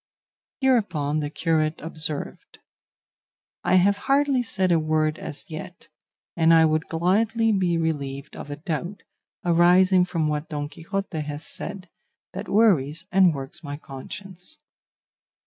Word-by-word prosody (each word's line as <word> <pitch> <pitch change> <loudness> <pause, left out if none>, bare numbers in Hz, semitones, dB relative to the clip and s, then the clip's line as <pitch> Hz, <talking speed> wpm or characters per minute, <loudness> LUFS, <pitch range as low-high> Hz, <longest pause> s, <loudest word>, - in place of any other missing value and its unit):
Hereupon 185 - +1
the 145 -1 -2
curate 155 0 0
observed, 155 -2 -5 1.1
"I 180 +1 +3
have 200 +2 +4
hardly 275 -2 +3
said 190 -6 0
a 165 - +4
word 155 0 0
as 145 -3 -7
yet; 170 +3 -9 0.5
and 165 -1 +4
I 160 0 +6
would 155 0 0
gladly 220 +7 +1
be 180 -4 +1
relieved 140 -4 -3
of - - -8
a 145 - -4
doubt, 170 +5 -5 0.4
arising 180 +2 +5
from 165 -3 -1
what 150 +1 -2
Don 145 -1 -4
Quixote 170 +2 -4
has 145 +1 -6
said, 195 -2 -7 0.5
that 200 +3 -6
worries 180 -7 +3
and 185 -1 +5
works 135 +4 -8
my 145 -1 -5
conscience." 180 - -10
165 Hz, 130 wpm, -24 LUFS, 155-190 Hz, 1.1 s, I